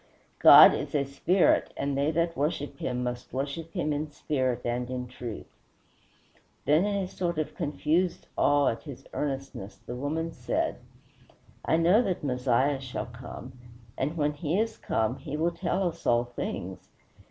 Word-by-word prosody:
God - - +10
is - - -4
a 140 - +3
Spirit, 170 +7 +2
and 140 0 -1
they 140 +2 +1
that 165 +1 0
worship 145 +1 -2
him 125 0 -2
must 125 0 -4
worship 145 +5 -4
him 155 -4 0
in 150 +1 -3
spirit 130 -4 -1
and 120 +1 -2
in 125 -1 -3
truth." 120 -3 -7 1.2
Then, 155 +6 +4
in 205 -1 0
a 195 -2 -1
sort 175 -2 -3
of 155 - -2
confused 165 +4 0
awe 145 -1 +3
at 115 - -4
his 140 -5 -10
earnestness, 135 -8 -4
the - - -5
woman 155 +5 -2
said, - - -2 0.9
"I 160 - +2
know 175 +7 +5
that 190 -9 -2
Messiah 130 +1 +1
shall 130 -5 -5
come, 125 +1 -9 0.4
and 150 +5 -2
when 150 -1 +1
he 155 +5 -1
is 225 0 0
come 110 +4 -1
he 150 -2 -5
will 165 +2 +1
tell 185 +1 -1
us 165 - -9
all 120 0 +4
things." 120 0 -6
145 Hz, 165 wpm, -28 LUFS, 125-165 Hz, 1.2 s, God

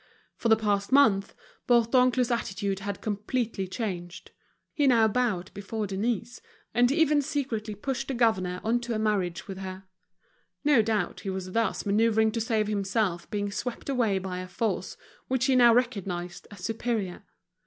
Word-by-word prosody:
For 230 - -1
the 220 - +7
past 205 -1 -1
month 220 -8 +4 0.3
Bourdoncle's 250 +1 +3
attitude 195 -4 -2
had 200 0 -5
completely 215 -1 -2
changed; 180 -4 -5 0.4
he 290 -2 +2
now 230 -4 +5
bowed 210 -5 -1
before 210 +2 -4
Denise, 225 +4 -2 0.3
and 245 +2 +4
even 300 -1 +3
secretly 255 -8 -3
pushed 270 +6 -3
the 270 - -2
governor 185 -7 +1
on 230 +2 +2
to 240 -1 -3
a - - 0
marriage 205 -6 -1
with 190 -1 -6
her. 190 0 -7 0.8
No 290 -5 +5
doubt 215 -1 -1
he 195 - -5
was 190 -1 -4
thus 230 +2 0
manoeuvring 220 +1 +3
to 230 +1 -2
save 220 -1 +1
himself 200 -3 -1
being 205 -1 -2
swept 245 +6 -5
away 235 -7 +1
by 185 -1 -4
a 185 - -6
force 210 +5 -2 0.3
which 260 0 +1
he 265 -1 +3
now 240 -2 +7
recognized 195 -8 -1
as 205 -3 -12
superior. 220 -2 -2
220 Hz, 160 wpm, -27 LUFS, 195-240 Hz, 0.8 s, the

